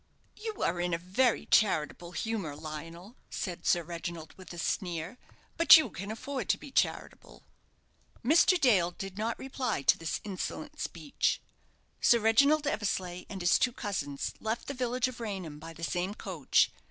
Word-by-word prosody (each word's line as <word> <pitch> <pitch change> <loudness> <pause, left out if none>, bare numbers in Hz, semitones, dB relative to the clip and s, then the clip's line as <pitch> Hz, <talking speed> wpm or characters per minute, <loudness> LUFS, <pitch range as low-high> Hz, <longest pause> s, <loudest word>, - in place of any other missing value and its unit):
"You 435 -1 -5
are 175 +1 0
in 175 -1 0
a - - -1
very 195 +8 +1
charitable 175 -3 +2
humour, 195 -4 -3
Lionel," 165 - -8
said 180 -3 -4
Sir 175 - +3
Reginald, 165 -1 -6
with 185 -1 -12
a 175 - -8
sneer; 175 +4 -3 0.4
"but 335 0 +10
you 315 - 0
can 195 +3 -6
afford 240 +1 -4
to - - +3
be 280 - -11
charitable." - - -2 0.8
Mr. 340 +6 +5
Dale 205 - +4
did 195 +2 -8
not 225 +1 -1
reply 255 - -3
to - - +4
this 165 - -2
insolent 195 -3 -5
speech. - - -1 0.6
Sir 235 - +5
Reginald 280 +8 +4
Eversleigh 190 -8 -2
and 195 -2 -6
his 175 - +4
two 250 - +2
cousins 145 - -3
left 225 +2 -3
the 280 - -3
village 250 0 0
of 255 -2 -8
Raynham 190 -9 -5
by 165 +2 -9
the 165 0 -11
same 180 +6 -1
coach. 180 -11 +1
195 Hz, 165 wpm, -30 LUFS, 170-240 Hz, 0.8 s, but